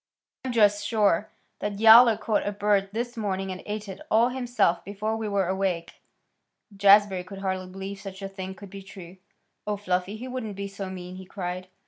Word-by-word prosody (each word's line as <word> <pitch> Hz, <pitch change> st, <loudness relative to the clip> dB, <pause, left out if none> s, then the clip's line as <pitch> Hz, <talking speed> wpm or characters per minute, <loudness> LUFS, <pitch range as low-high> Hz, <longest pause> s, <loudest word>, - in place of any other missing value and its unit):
I'm 260 Hz, -, -3 dB
just 205 Hz, -3 st, +3 dB
sure 205 Hz, -2 st, +2 dB, 0.3 s
Yowler 220 Hz, +2 st, +7 dB
caught 215 Hz, -3 st, -1 dB
a -, -, 0 dB
bird 205 Hz, -1 st, +1 dB
this 240 Hz, +3 st, -3 dB
morning 195 Hz, -3 st, -2 dB
and 185 Hz, -, -6 dB
ate 210 Hz, 0 st, -4 dB
it 190 Hz, -, -8 dB
all 230 Hz, +3 st, +4 dB
himself 240 Hz, -9 st, 0 dB
before 210 Hz, +2 st, -3 dB
we 220 Hz, -1 st, -3 dB
were 200 Hz, -3 st, +1 dB
awake." 185 Hz, -3 st, -2 dB, 0.7 s
Jazbury 200 Hz, -1 st, +5 dB
could 195 Hz, +2 st, -10 dB
hardly 190 Hz, -1 st, -2 dB
believe 195 Hz, +1 st, -7 dB
such 195 Hz, -1 st, -9 dB
a -, -, -2 dB
thing 190 Hz, -1 st, -7 dB
could 195 Hz, -1 st, -12 dB
be 195 Hz, -, -8 dB
true. 190 Hz, -2 st, -12 dB, 0.5 s
"Oh, 210 Hz, -1 st, -1 dB
Fluffy! 185 Hz, +1 st, -2 dB
He 250 Hz, +4 st, -7 dB
wouldn't 250 Hz, -5 st, -5 dB
be 200 Hz, +1 st, -4 dB
so 195 Hz, -1 st, -6 dB
mean!" 180 Hz, -1 st, -8 dB
he 190 Hz, -, -9 dB
cried. 185 Hz, -1 st, -5 dB
200 Hz, 185 wpm, -26 LUFS, 190-215 Hz, 0.7 s, Yowler